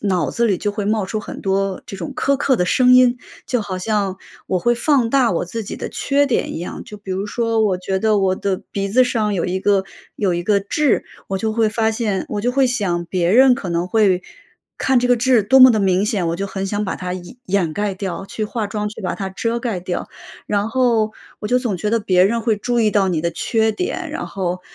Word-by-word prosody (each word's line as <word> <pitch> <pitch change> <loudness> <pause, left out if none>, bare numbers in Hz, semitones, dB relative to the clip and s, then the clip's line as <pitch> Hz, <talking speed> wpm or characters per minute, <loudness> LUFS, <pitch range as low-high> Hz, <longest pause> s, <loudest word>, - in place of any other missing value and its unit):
脑 185 -6 0
子 235 0 +1
里 195 -4 +2
就 205 +2 -2
会 205 -1 -3
冒 215 -1 +1
出 215 +3 -3
很 - - -9
多， 195 0 -1
这 195 - -8
种 170 - -6
苛 280 - +2
刻 270 -2 +2
的 180 - +1
声 250 +6 +4
音， 250 -1 +5 0.3
就 250 - -1
好 195 -3 -4
像 200 0 -1 0.3
我 185 - 0
会 240 +5 +2
放 240 -1 +2
大 260 -3 +3
我 170 - -1
自 225 +6 -5
己 205 - -6
的 - - -5
缺 285 +1 +1
点 270 -4 -1
一 - - -4
样。 175 - -6
就 210 - -10
比 200 -2 -10
如 195 +2 -2
说， 230 0 0
我 195 -4 +2
觉 190 +1 -2
得 215 +1 +2
我 190 -1 +2
的 190 -1 -2
鼻 200 0 -2
子 255 +6 +4
上 215 -4 0
有 175 - -1
一 185 +1 -2
个 195 -1 +2 0.3
有 195 -4 0
一 175 - -2
个 200 +2 +2
痣， 275 +8 +1 0.2
我 195 - -1
就 220 +3 -1
会 225 -1 +2
发 220 +1 +1
现 215 -4 -1
我 205 - -2
就 245 - 0
会 270 +1 +3
想 195 -9 -1
别 175 0 0
人 255 +4 +6
可 195 - -6
能 170 +1 -1
会 190 -2 +2 0.6
看 265 -1 +3
这 250 - 0
个 245 - +5
痣 245 -1 +3
多 265 +7 +4
么 255 0 +10
的 220 - +2
明 190 0 +2
显， 200 -5 0
我 165 - -1
就 200 +2 -3
很 195 0 -4
想 205 +1 -2
把 190 - -3
它 180 0 -4 0.3
掩 185 -4 0
盖 205 +2 -2
掉， 190 0 -5
去 215 +2 -4
化 215 0 -3
妆， 210 +1 -3
去 215 - -10
把 185 - -2
它 195 -1 -5
遮 230 +5 -2
盖 225 -6 -3
掉。 175 0 -4 0.4
然 205 +1 0
后 230 -3 +1 0.3
我 210 - -5
就 250 +2 +3
总 230 -7 -2
觉 210 - -2
得 230 +2 +2
别 185 -4 +3
人 230 +4 +1
会 220 -3 +1
注 240 +3 -1
意 220 -2 +3
到 195 -2 +2
你 165 -3 -1
的 170 - 0
缺 220 +4 0
点， 360 - -3
然 320 - -4
后， 180 -2 -3
210 Hz, 265 characters per minute, -19 LUFS, 190-235 Hz, 0.6 s, 么